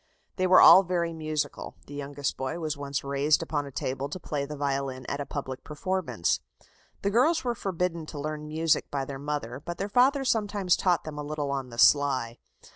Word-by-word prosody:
They 185 - +2
were 185 - +7
all 190 - +10
very 175 -2 -1
musical 155 -3 -3
the 145 - -11
youngest 145 0 -3
boy 135 +5 -3
was 155 -2 -3
once 140 -1 -4
raised 140 +3 +2
upon 145 -3 -2
a - - -9
table 135 +2 -3
to 185 - -6
play 145 -4 -3
the 150 0 -7
violin 135 -2 -2
at 140 - -3
a 140 - -5
public 130 -3 -5
performance. 150 - -1 0.6
The 200 - +1
girls 310 +9 +3
were 245 -2 0
forbidden 180 -6 -2
to 150 - -7
learn 150 +1 -4
music 160 +1 +1
by 140 -2 -2
their 135 0 -7
mother, 140 -3 -4
but 175 0 -5
their 200 +2 -3
father 270 +5 +3
sometimes 205 -6 +1
taught 180 -3 +1
them 150 -1 -7
a - - -3
little 145 -1 -3
on 135 -2 -3
the 115 - -10
sly. 130 -4 +3
150 Hz, 200 wpm, -27 LUFS, 140-175 Hz, 0.6 s, all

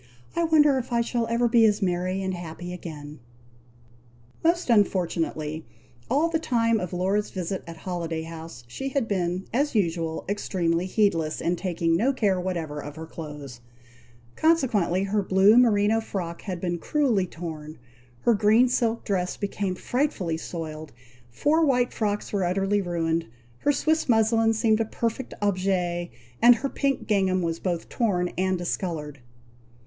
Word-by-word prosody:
"I 335 0 +2
wonder 300 -4 +4
if 255 0 -7
I 235 0 +2
shall 235 0 -1
ever 235 +1 +2
be 230 0 +4
as 210 -1 +3
merry 185 0 -1
and 190 0 -2
happy 175 0 -7
again!" 150 -4 -8 1.2
Most 340 +2 +2
unfortunately, 165 -6 0 0.5
all 300 +4 +3
the 330 -1 0
time 230 -6 +1
of 180 -3 -4
Laura's 190 +3 0
visit 185 0 -4
at 165 -1 -8
Holiday 165 -2 -4
House, 160 -5 -9
she 270 - -5
had 270 -4 -1
been, 185 -2 -1
as 280 +2 +1
usual, 165 -5 -1
extremely 180 -3 -1
heedless, 170 -7 +1
in 175 - 0
taking 170 -2 0
no 245 +10 +2
care 200 -7 +1
whatever 170 -5 -3
of 145 0 -8
her 160 0 -7
clothes; 150 -6 -9 0.7
consequently 230 - +2
her 205 +1 0
blue 190 +3 +5
merino 225 -2 +4
frock 175 -6 -5
had 185 -4 -5
been 175 -1 -2
cruelly 240 - +1
torn; 160 -3 -7 0.4
her 235 - +4
green 220 +4 +4
silk 235 -2 0
dress 185 -3 -1
became 200 -2 -2
frightfully 220 - -1
soiled; 155 -2 -6 0.4
four 300 - +2
white 250 -4 +2
frocks 210 -2 -2
were 200 -2 +1
utterly 195 +3 +1
ruined; 165 -2 -1 0.3
her 290 - +2
Swiss 315 +1 0
muslin 225 0 +4
seemed 220 0 +2
a 225 - +1
perfect 230 +3 -3
object, 180 -3 0 0.3
and 240 +1 +8
her 275 +4 -3
pink 275 -1 -1
gingham 190 -3 +1
was 165 -1 -2
both 175 -3 -2
torn 180 -7 0
and 185 0 +1
discoloured. 165 -5 -4
190 Hz, 155 wpm, -25 LUFS, 170-230 Hz, 1.2 s, and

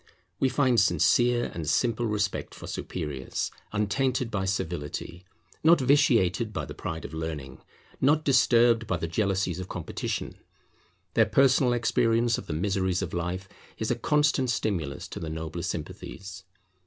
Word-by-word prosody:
We 135 - +3
find 130 -4 +3
sincere 120 +7 +3
and 80 -2 -3
simple 115 +5 +1
respect 105 -1 -2
for - - -9
superiors, 75 -7 -4 0.2
untainted 125 +4 0
by 95 -2 -1
servility, 85 -1 -4 0.4
not 165 +1 +6
vitiated 120 - +3
by 95 - -3
the - - -8
pride 80 0 -5
of - - -8
learning, 80 -5 -5 0.4
not 150 +3 +4
disturbed 120 -4 +4
by 95 - 0
the 85 - -3
jealousies 95 -1 0
of 95 - -6
competition. 90 - -4 0.7
Their - - +4
personal 135 -2 +4
experience 115 -1 +2
of - - -11
the 80 - -3
miseries 95 +2 0
of 85 - -5
life 90 +2 -3 0.3
is 110 - -1
a - - +2
constant 150 +1 +2
stimulus 85 -11 -2
to - - -6
the 80 - -5
nobler 80 +1 -5
sympathies. 95 +2 -6
100 Hz, 145 wpm, -27 LUFS, 85-120 Hz, 0.7 s, not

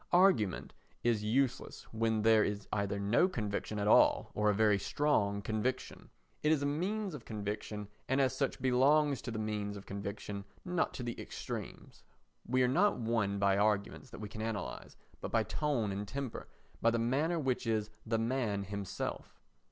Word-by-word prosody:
Argument 175 - +3 0.3
is 115 -3 +2
useless 125 +4 0
when 110 -1 +1
there 110 -1 +6
is 100 0 -3
either 100 -1 0
no 105 - +3
conviction 105 - -3
at 105 0 0
all - - +5
or 105 0 +2
a - - +4
very 105 -1 +4
strong 100 -6 +1
conviction. 110 +5 -3 0.3
It 150 - +3
is 150 -3 +2
a - - +1
means 185 +7 -1
of 140 -6 -7
conviction 105 -1 -4 0.2
and 135 +1 +2
as 130 -1 +2
such 135 0 -1
belongs 135 +2 +3
to - - -6
the 115 - -4
means 105 -1 -2
of 100 - -10
conviction, 100 0 -5 0.2
not 180 -2 0
to 125 - -5
the 120 -1 -4
extremes. - - -7 0.5
We 130 +1 +3
are - - +4
not 180 +11 +3
won 110 -4 0
by 100 0 +3
arguments 105 +3 0
that - - -10
we 105 - -4
can 110 +1 -7
analyse, 110 -4 -4 0.2
but - - -5
by - - +2
tone 140 -9 -1
and 100 +1 -4
temper, 135 +1 -5 0.3
by 115 - +5
the 115 - +1
manner 140 +9 +1
which 130 -6 -1
is 110 -1 0
the 115 0 0
man 115 -3 0
himself. 100 -1 -5
110 Hz, 175 wpm, -33 LUFS, 105-135 Hz, 0.5 s, there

